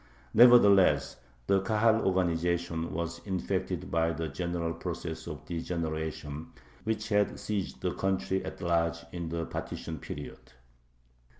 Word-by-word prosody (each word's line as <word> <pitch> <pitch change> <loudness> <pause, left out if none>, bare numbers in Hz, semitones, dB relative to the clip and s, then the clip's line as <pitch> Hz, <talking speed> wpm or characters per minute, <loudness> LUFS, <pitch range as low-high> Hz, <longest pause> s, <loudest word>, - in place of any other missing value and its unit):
Nevertheless 110 -5 +6 0.3
the 95 +5 +3
Kahal 110 +2 +3
organization 85 -2 0
was 85 0 -3
infected 95 -9 -2
by 80 0 +2
the 80 0 -3
general 85 +1 -2
process - - -5
of - - -7
degeneration, 80 -3 -4 0.3
which 110 0 -1
had 105 -1 +2
seized 105 -3 -3
the - - -1
country 95 0 0
at - - -7
large 85 -1 +1
in 85 -2 -4
the 85 0 -2
partition 80 0 -5
period. 65 -1 -8
85 Hz, 120 wpm, -30 LUFS, 80-95 Hz, 0.3 s, Nevertheless